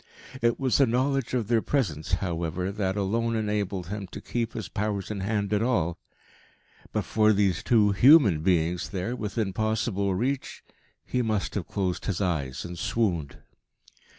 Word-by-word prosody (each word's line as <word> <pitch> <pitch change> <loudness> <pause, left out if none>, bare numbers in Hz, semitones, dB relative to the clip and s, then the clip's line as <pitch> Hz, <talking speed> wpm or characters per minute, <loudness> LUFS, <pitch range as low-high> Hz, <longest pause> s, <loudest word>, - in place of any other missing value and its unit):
It 120 0 +2
was 130 -1 +2
the 135 - +5
knowledge 130 +2 0
of 115 -5 -1
their 115 -1 +3
presence, 90 - -1
however, 90 0 -1
that 100 -1 -2
alone 115 +4 0
enabled 105 -5 -2
him 100 -1 -5
to - - -8
keep 115 -1 -3
his 110 -5 -5
powers 105 -1 -3
in 105 - -4
hand 100 +1 -1
at 105 - +2
all. 100 -9 0 0.9
But - - -1
for 110 -1 +3
these 95 -4 +1
two 105 -4 +4
human 110 - +6
beings 85 0 +1
there 100 +5 -3
within 105 -3 -2
possible 110 -2 0
reach, 130 +7 -2 0.4
he 125 - -1
must 110 -4 -1
have 100 -5 -3
closed 95 -3 -2
his 95 -4 -1
eyes 75 -8 -2
and 85 -1 -7
swooned. 85 -12 -1
105 Hz, 160 wpm, -27 LUFS, 90-115 Hz, 0.9 s, human